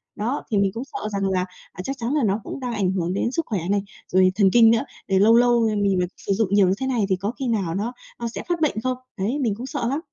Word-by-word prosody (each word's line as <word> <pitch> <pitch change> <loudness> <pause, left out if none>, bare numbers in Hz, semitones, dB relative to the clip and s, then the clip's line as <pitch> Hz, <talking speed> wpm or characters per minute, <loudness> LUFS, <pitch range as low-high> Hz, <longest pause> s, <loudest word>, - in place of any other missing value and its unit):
Đó, 235 +7 -2
thì 205 - +2
mình 195 -1 +2
cũng 230 - -4
sợ 215 -5 -5
rằng 195 -1 0
là, 185 -1 +1 0.3
à, 185 - -7
chắc 270 +5 -4
chắn 235 +5 -1
là 295 -5 +2
nó 205 +1 +1
cũng - - -6
đang 250 -2 -3
ảnh 190 -4 +1
hưởng 180 -1 -1
đến 235 +5 0
sức 330 +3 -1
khỏe 205 -5 -2
này, 200 0 +2 0.3
rồi 185 0 +4
thần 200 -2 +4
kinh 230 -1 +7
nữa, 230 - +3 0.3
rồi 190 -1 +2
lâu 225 +3 +6
lâu, 240 0 +4
ờ, 215 - -1
mình 200 -2 +2
vẫn 180 - +1
sử 200 - -2
dụng 215 +1 +1
nhiều 200 -2 +5
như 185 - +3
thế 265 - 0
này 240 -6 +1
thì 190 - +3
có 200 +4 -3
khi 265 - -2
nào 195 -8 0
nó, 210 +5 -2 0.3
ơ, 235 - -3
sẽ - - -5
phát 345 -2 0
bệnh 310 - +2
không? 255 -1 0 0.2
Đấy, 225 +10 -1
mình 230 -7 0
cũng 240 +4 -6
sợ 240 -2 -3
lắm. 280 +4 -1
215 Hz, 300 wpm, -23 LUFS, 195-245 Hz, 0.3 s, kinh